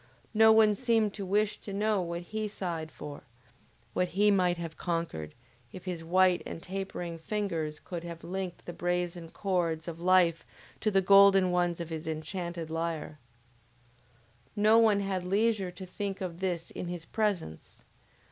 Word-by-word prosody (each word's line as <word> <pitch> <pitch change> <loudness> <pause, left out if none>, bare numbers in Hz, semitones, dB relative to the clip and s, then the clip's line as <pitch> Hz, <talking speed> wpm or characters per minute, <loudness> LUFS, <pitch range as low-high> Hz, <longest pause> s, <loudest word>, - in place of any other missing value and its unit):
No 220 0 +7
one 220 -1 +6
seemed 225 -2 +1
to 195 -2 -5
wish 205 +2 +1
to 200 - -7
know 210 0 +1
what 170 0 -4
he 215 +4 -3
sighed 170 -6 -4
for, 145 -1 -8 0.7
what 180 - +1
he 205 +3 +3
might 180 -3 +2
have 165 -2 -6
conquered, 165 - -3 0.4
if 185 - -10
his 175 -3 -4
white 180 +1 +3
and - - -6
tapering 180 -3 -5
fingers 165 -5 -2
could 170 -2 -6
have 170 -1 -8
linked 185 0 -5
the 175 - -6
brazen 175 -1 -2
chords 170 -4 -1
of 165 -1 -6
life 175 -2 +4 0.4
to 215 - +1
the 195 -2 +3
golden 195 -1 +7
ones 175 -1 +1
of 170 -1 -5
his 160 0 -5
enchanted 165 +1 -4
lyre! 165 -2 -3 1.4
No 215 +2 +5
one 215 -3 +4
had 190 -2 -2
leisure 200 +1 +1
to 185 +1 -9
think 195 +1 -4
of 175 -3 -5
this 175 -3 -2
in 180 - -5
his 175 -1 -5
presence. 200 - -3
180 Hz, 160 wpm, -30 LUFS, 170-200 Hz, 1.4 s, No